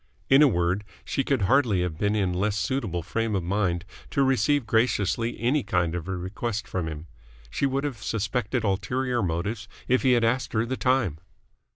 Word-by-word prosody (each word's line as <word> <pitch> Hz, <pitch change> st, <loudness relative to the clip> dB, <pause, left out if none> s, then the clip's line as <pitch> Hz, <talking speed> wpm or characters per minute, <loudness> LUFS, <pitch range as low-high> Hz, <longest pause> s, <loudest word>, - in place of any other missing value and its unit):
In 135 Hz, +2 st, +8 dB
a 150 Hz, -, +8 dB
word, 90 Hz, -2 st, +1 dB, 0.2 s
she 135 Hz, -, -1 dB
could 130 Hz, -6 st, 0 dB
hardly 110 Hz, -4 st, +3 dB
have 80 Hz, -3 st, -4 dB
been 105 Hz, +1 st, +1 dB
in 95 Hz, -4 st, +1 dB
less 100 Hz, +3 st, 0 dB
suitable 105 Hz, -5 st, -1 dB
frame 115 Hz, +3 st, -1 dB
of 95 Hz, -, -1 dB
mind 90 Hz, -1 st, 0 dB, 0.2 s
to 140 Hz, -, +2 dB
receive 135 Hz, +1 st, +2 dB
graciously 115 Hz, -1 st, +1 dB
any 130 Hz, +6 st, +2 dB
kind 85 Hz, -6 st, 0 dB
of 90 Hz, -1 st, -4 dB
a 95 Hz, -1 st, -2 dB
request 100 Hz, +4 st, -4 dB
from 90 Hz, -3 st, -3 dB
him. 75 Hz, 0 st, -6 dB, 0.5 s
She 140 Hz, -, +1 dB
would 135 Hz, +1 st, -1 dB
have 135 Hz, -8 st, -4 dB
suspected 105 Hz, +3 st, -1 dB
ulterior 120 Hz, +5 st, 0 dB
motives 100 Hz, +5 st, -2 dB, 0.2 s
if 130 Hz, +1 st, +3 dB
he 130 Hz, -2 st, +4 dB
had 120 Hz, -1 st, +3 dB
asked 125 Hz, +3 st, 0 dB
her 110 Hz, 0 st, +1 dB
the 130 Hz, +2 st, -2 dB
time. 125 Hz, -, +1 dB
110 Hz, 190 wpm, -26 LUFS, 95-125 Hz, 0.5 s, In